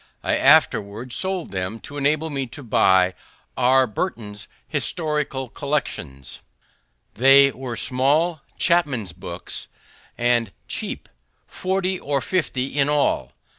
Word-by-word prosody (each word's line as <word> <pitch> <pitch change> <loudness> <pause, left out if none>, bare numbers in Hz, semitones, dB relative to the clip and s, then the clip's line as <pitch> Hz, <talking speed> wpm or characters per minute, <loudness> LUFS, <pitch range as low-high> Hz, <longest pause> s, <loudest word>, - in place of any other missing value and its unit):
I - - +1
afterward 110 +5 +3
sold 190 -2 -1
them 95 +3 -3
to 145 - -10
enable 150 +3 0
me 135 -2 -2
to 120 +5 -10
buy 95 -5 +3 0.4
R. 130 +1 +4
Burton's 105 - -5 0.2
Historical 150 -3 -1
Collections; 115 - -4 0.7
they 135 +3 +6
were 125 -2 -6
small 145 +5 +1 0.2
chapmen's 140 - +1
books, - - -6 0.5
and 120 -3 +1 0.2
cheap, - - -4 0.4
40 185 0 -2
or 140 -1 -1
50 135 -7 -1
in 140 +1 +3
all. 140 - +1
135 Hz, 110 wpm, -22 LUFS, 115-150 Hz, 0.7 s, they